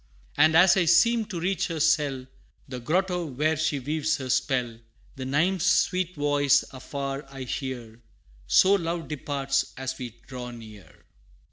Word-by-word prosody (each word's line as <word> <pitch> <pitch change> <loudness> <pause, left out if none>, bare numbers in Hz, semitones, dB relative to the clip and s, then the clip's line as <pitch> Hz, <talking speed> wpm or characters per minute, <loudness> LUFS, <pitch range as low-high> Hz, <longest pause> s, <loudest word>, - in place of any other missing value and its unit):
And, 155 +2 +4
as 180 +1 +6
I 175 - +3
seem 230 +7 +4
to 195 -5 -6
reach 185 +1 -1
her 165 -2 -4
cell 145 -4 +1 0.4
The 125 -1 -6
grotto, 180 +6 0
where 155 +1 0
she 155 -1 0
weaves 155 +3 -1
her 130 -3 -4
spell 125 -3 0 0.4
The 130 -1 -6
Nymph's 165 +7 +1
sweet 185 -1 +1
voice 145 -1 +3
afar 135 +1 -5
I 135 -1 -7
hear 120 -3 -6 0.5
So 190 +1 +5
Love 170 -3 -1
departs, 140 -2 -2
as 130 0 -4
we 120 -3 -7
draw 125 -2 -7
near! 110 -7 -13
145 Hz, 150 wpm, -26 LUFS, 130-165 Hz, 0.5 s, as